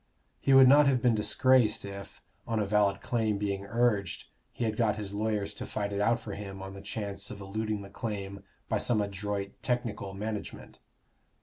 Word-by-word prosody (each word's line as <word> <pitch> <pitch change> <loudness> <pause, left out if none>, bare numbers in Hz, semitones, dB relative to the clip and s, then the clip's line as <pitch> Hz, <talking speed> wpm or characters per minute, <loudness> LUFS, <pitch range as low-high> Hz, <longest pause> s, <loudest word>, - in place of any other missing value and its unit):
He 135 - +1
would 135 -1 +9
not 145 +2 +7
have 130 -2 +3
been 120 -1 +3
disgraced 110 +2 +3
if, 100 0 -9 0.2
on 115 -1 0
a 105 - +1
valid 100 -1 +2
claim 110 -4 0
being 100 -1 -2
urged, 115 -6 +1 0.3
he - - -4
had 110 -1 0
got 110 -2 +2
his 105 -2 -6
lawyers 105 -1 -1
to - - -6
fight 100 -1 -3
it 100 - -1
out 115 +3 +3
for 110 -3 -7
him 100 -1 -7
on 95 0 -7
the 95 - -9
chance 100 -1 -4
of 100 - -8
eluding 105 +1 -3
the 100 - -10
claim 100 -2 -5 0.3
by - - 0
some 115 -3 +2
adroit 100 0 -2
technical 115 -6 -2
management. 105 +1 -6
105 Hz, 190 wpm, -30 LUFS, 100-115 Hz, 0.3 s, would